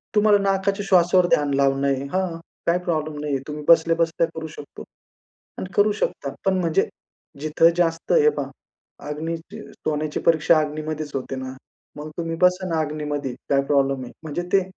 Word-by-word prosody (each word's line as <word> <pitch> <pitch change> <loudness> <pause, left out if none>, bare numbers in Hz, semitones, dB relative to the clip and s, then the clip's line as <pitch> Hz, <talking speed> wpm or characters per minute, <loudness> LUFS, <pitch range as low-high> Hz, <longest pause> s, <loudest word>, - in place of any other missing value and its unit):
तुम्हाला 210 0 +5
नाकाच्या 195 +1 0
श्वासावर 180 0 +5
ध्यान 145 -1 +2
लावणं 135 0 +2
आहे, 135 -1 0
हां. 185 -3 -1 0.3
काही 170 +1 +3
प्रॉब्लेम 155 -3 -2
नाहीये. 145 -2 -1
तुम्ही 150 0 -6
बसल्या 165 0 +5
बसल्या 165 0 +1
करू 160 0 -5
शकतो. 150 -2 -10 0.7
आणि 185 - -5
करू 205 +1 +4
शकता. 140 -8 -3
पण 190 -1 +3
म्हणजे 165 -3 +1 0.5
जिथं 155 +2 +4
जास्त 165 -2 0
हे 455 -2 +6
पहा - - -2 0.6
अग्नी 160 +3 -3
सोन्याची 155 -2 -5
परीक्षा 160 0 +4
अग्नीमध्येच 155 0 -3
होते 135 0 -3
ना? 130 0 -5 0.4
मग 150 +1 -6
तुम्ही 165 -1 -2
बसा 180 +1 +3
ना 165 -1 0
अग्नीमध्ये. 150 -3 -3 0.2
काय 140 -1 +3
प्रॉब्लेम 135 -2 +1
आहे. 120 - -9
म्हणजे 160 +2 -3
ते 195 - +6
155 Hz, 165 wpm, -23 LUFS, 145-175 Hz, 0.7 s, हे